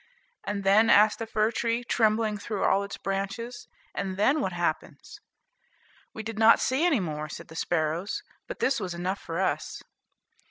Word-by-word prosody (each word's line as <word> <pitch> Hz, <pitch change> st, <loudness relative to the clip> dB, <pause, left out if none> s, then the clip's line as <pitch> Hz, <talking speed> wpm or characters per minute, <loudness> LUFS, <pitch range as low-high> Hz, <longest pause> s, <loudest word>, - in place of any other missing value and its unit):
"And 205 Hz, -1 st, -3 dB
then," 205 Hz, +4 st, +5 dB
asked 210 Hz, +1 st, +5 dB
the 225 Hz, -, -4 dB
fir 215 Hz, 0 st, +1 dB
tree, 235 Hz, +1 st, -1 dB
trembling 220 Hz, -2 st, +1 dB
through 200 Hz, -1 st, -3 dB
all 195 Hz, -, +3 dB
its 200 Hz, 0 st, -6 dB
branches, 200 Hz, +5 st, -4 dB, 0.3 s
"and 190 Hz, -1 st, -3 dB
then 275 Hz, +9 st, +3 dB
what 190 Hz, -, -1 dB
happens?" 175 Hz, -3 st, -4 dB, 0.9 s
"We 220 Hz, -, -7 dB
did 220 Hz, 0 st, -6 dB
not 225 Hz, 0 st, +7 dB
see 260 Hz, +5 st, +1 dB
any 335 Hz, -8 st, +3 dB
more," 155 Hz, -4 st, -4 dB
said -, -, -9 dB
the 160 Hz, -, -11 dB
sparrows; 165 Hz, +3 st, -1 dB, 0.2 s
"but -, -, -6 dB
this 270 Hz, +1 st, +1 dB
was 180 Hz, -2 st, -4 dB
enough 185 Hz, +3 st, -2 dB
for 165 Hz, +1 st, -4 dB
us." 190 Hz, -, -2 dB
205 Hz, 170 wpm, -27 LUFS, 185-225 Hz, 0.9 s, not